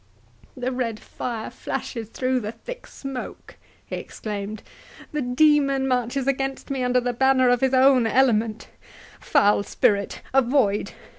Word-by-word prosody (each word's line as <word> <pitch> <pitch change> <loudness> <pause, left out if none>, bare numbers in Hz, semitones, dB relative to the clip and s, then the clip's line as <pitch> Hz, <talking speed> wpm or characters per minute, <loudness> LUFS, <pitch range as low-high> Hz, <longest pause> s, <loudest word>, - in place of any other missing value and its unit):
—"The 255 0 -2
red 235 -4 -2
fire 230 -3 -5
flashes 225 -3 -5
through 255 +2 0
the 215 -2 -4
thick - - -9
smoke!" 270 -2 -8 0.3
he - - -5
exclaimed; 210 0 -6 0.5
"the 300 - -2
demon 275 +1 +3
marches 250 +1 0
against 270 0 -2
me 270 -2 -1
under 250 0 +3
the 245 0 -2
banner 260 0 +4
of 245 0 +2
his 265 0 +2
own 260 -2 +5
element—Foul 225 -3 0
spirit, 200 0 0
avoid! 245 -6 +2
250 Hz, 130 wpm, -24 LUFS, 225-270 Hz, 0.5 s, own